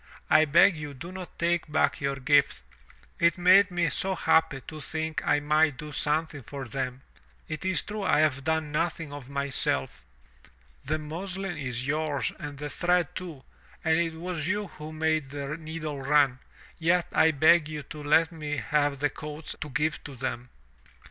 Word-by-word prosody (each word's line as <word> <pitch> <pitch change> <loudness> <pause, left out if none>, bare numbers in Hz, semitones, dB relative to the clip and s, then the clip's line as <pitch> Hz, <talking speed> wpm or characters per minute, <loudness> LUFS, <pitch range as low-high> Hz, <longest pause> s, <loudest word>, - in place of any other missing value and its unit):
I 155 - +7
beg 170 +5 +5
you 150 -2 -7
do 170 +7 -8
not 185 -1 -9
take 170 -2 0
back 155 - +1
your 140 0 0
gift. 140 +1 +2 0.6
It 170 +2 +3
made 185 +3 +6
me 175 -2 0
so 190 +7 -1
happy 160 -5 +2
to 155 +3 -9
think 160 +1 -3
I 145 - +3
might 150 -1 +2
do 150 +1 -7
something 150 +1 -1
for 135 +1 -7
them. 130 +1 -4 0.4
It 155 +3 -5
is 190 0 +2
true 215 0 -5
I 185 -5 +3
have 140 -3 +1
done 160 0 0
nothing 165 -1 -2
of 140 -3 -9
myself. 130 - 0 0.8
The 155 - 0
muslin 180 +4 -5
is 125 -4 -3
yours 150 0 0
and 145 -1 -7
the 150 +1 -5
thread 175 +3 +1
too, 165 -7 -7 0.4
and 160 0 +3
it 165 -1 -1
was 165 -2 -4
you 205 0 -1
who 155 0 -9
made 155 -2 0
the 140 +1 -4
needle 155 -3 -6
run, 140 -2 +3 0.4
yet 170 +1 +2
I 160 - +5
beg 155 +1 +4
you 150 -1 -5
let 150 +3 +2
me 150 -3 -4
have 145 +4 +1
the 145 +1 +1
coats 150 +1 -5
to 150 - -4
give 150 +1 -1
to 140 - -8
them." 125 -1 -4
155 Hz, 175 wpm, -27 LUFS, 140-165 Hz, 0.8 s, I